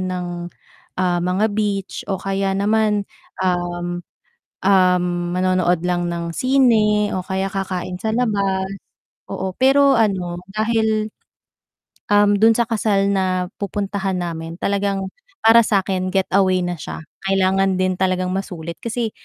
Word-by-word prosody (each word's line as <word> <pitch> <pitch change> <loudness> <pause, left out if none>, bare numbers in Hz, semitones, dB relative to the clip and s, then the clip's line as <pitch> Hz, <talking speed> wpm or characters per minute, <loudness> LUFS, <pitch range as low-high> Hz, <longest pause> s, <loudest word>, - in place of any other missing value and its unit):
ng 185 -1 -3 1.0
mga 185 +3 +1
beach 205 -2 -2
o 195 - 0
kaya 195 0 -1
naman, 210 0 +1 0.4
um, 175 -1 -1 0.6
um, 185 -2 +4 0.3
manonood 185 -2 +1
lang 175 -1 0
ng 170 -1 -3
sine 220 -4 +3
o 185 - -1
kaya 190 0 -2
kakain 185 -2 -4
sa 220 0 -1
labas, 195 -5 0 0.6
oo, 190 -1 -4
pero 275 +1 +5
ano 190 -6 0 0.2
dahil, 220 0 +1 1.1
um, 205 0 +5
dun 225 +2 +5
sa 235 - +2
kasal 205 -3 +1
na 185 -1 0 0.2
pupuntahan 195 -1 -2
namin 165 -1 -5
talagang 200 -1 -1 0.4
para 225 +1 +8
sakin 190 -3 0
getaway 190 -1 +2
na 175 0 -3
siya, - - -7 0.3
kailangan 195 0 +2
din 185 0 +1
talagang 185 -1 0
masulit. 170 -4 -5
Kasi 230 -1 -2
195 Hz, 120 wpm, -20 LUFS, 185-210 Hz, 1.1 s, para